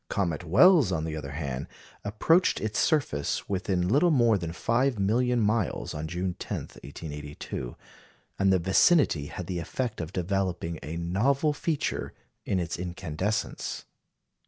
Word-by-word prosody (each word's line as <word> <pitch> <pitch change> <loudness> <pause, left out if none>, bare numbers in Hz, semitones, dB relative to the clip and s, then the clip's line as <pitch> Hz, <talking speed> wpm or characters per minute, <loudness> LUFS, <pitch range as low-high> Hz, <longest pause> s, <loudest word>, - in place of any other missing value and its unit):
Comet 90 -4 -1
Wells, 130 - +6
on 80 -3 -1
the 80 -1 -3
other 70 -3 -6
hand, 70 -2 -4 0.4
approached 160 - +3
its 110 0 -2
surface 130 - 0
within 95 -2 0
little 145 - +4
more 120 -7 +4
than 85 -4 -3
five 120 +7 +1
million 120 +5 +2
miles 110 -2 0
on 75 +1 -4
June 90 +2 -2
10, - - -3 0.2
1882; 75 -4 -7 0.6
and 95 0 +4
the 95 - +5
vicinity 95 - +3
had 90 - -6
the 90 0 -3
effect 115 +5 -3
of 80 +1 -5
developing 90 -3 -2
a 80 +2 -5
novel 125 - +1
feature 150 0 -2 0.3
in 95 - 0
its 85 -1 -3
incandescence. 90 +3 -3
95 Hz, 140 wpm, -28 LUFS, 80-115 Hz, 0.6 s, Wells